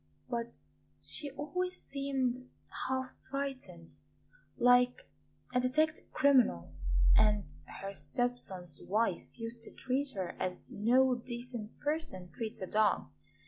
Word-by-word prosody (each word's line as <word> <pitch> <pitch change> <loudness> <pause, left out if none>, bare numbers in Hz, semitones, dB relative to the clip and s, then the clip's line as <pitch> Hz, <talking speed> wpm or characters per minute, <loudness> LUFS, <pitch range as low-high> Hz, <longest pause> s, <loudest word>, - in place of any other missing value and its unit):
But 235 -1 -3 0.4
she 290 - +2
always 305 +7 -3
seemed 260 -2 -1 0.4
half 260 0 -1 0.2
frightened, 260 -12 -5 0.6
like 245 0 +6 0.6
a 250 - +4
detected 310 +5 +1
criminal; 255 - +4 0.4
and 210 -5 +4 0.4
her 195 0 -4
step 245 +4 0
son's 180 -8 -4
wife 210 -2 +1
used 230 0 -6
to - - -9
treat 270 +2 -1
her 185 -2 -2
as 180 -1 -2
no 250 +5 +4
decent 240 -2 -5
person 295 - -2
treats 220 -5 -5
a - - 0
dog. 210 - +2
245 Hz, 115 wpm, -33 LUFS, 210-270 Hz, 0.6 s, like